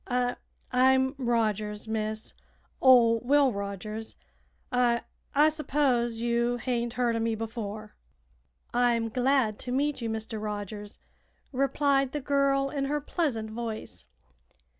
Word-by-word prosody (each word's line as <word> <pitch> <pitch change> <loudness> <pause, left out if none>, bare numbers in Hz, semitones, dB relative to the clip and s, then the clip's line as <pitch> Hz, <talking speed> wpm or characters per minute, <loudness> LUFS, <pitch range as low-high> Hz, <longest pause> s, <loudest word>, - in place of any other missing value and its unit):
"I 245 -1 0 0.4
I'm 260 +1 +4
Rogers, 215 -3 0
miss; 215 0 -3 0.5
ol' 235 -3 +6
Will 275 +1 +3
Rogers. 200 +2 -5 0.6
I 245 -1 +2 0.3
I 300 +2 +6
s'pose 265 -7 0
you 235 +1 +1
hain't 240 -1 -2
heerd 245 -2 +1
o' - - 0
me 225 0 0
before." 215 -1 -6 0.8
"I'm 240 -2 +2
glad 250 -2 +1
to 250 - -5
meet 285 +1 0
you, 230 - -2
Mr. 220 0 -4
Rogers," 205 0 -5 0.5
replied 275 0 +1
the 295 - -1
girl 275 -1 +1
in 275 -2 -1
her 295 +2 0
pleasant 270 -8 -2
voice. 220 - -6
240 Hz, 120 wpm, -28 LUFS, 220-265 Hz, 0.8 s, ol